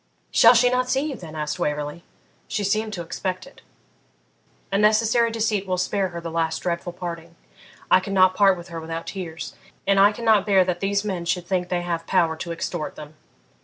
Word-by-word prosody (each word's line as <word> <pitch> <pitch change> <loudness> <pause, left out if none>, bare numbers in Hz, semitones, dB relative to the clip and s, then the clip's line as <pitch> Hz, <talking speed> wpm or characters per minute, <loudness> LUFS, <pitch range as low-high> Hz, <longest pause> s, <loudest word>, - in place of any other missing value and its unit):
'Shall - - +7
she 245 +2 +5
not 250 0 0
see 265 +1 +2
you - - -5
then?' 160 -7 -10
asked 150 -1 -3
Waverley. 150 +3 -3 0.4
'She 205 - -2
seemed 215 +2 0
to 175 -3 -4
expect 185 +2 -4
it.' 275 - -17 1.1
'A 195 - +1
necessary 225 +2 +3
deceit 220 -3 -1
will 185 -1 0
spare 190 +2 0
her 170 -1 -7
the 165 -1 -6
last 160 -1 -1
dreadful 175 0 -2
parting. 170 -2 -7 0.6
I - - +7
could 195 +1 -5
not 185 -1 +5
part 195 -1 +4
with 175 0 -10
her 165 -1 -6
without 165 +1 -5
tears, 175 -4 -6 0.3
and 195 0 +3
I 200 +1 +7
cannot 220 -2 +2
bear 190 -2 +5
that 180 -1 -2
these 200 +1 0
men 185 -4 -3
should 180 0 -1
think 180 -1 -1
they 175 -1 -1
have 170 -1 -3
power 170 -4 +2
to 170 - -5
extort 165 -1 -4
them. 150 0 -10
185 Hz, 200 wpm, -23 LUFS, 170-205 Hz, 1.1 s, Shall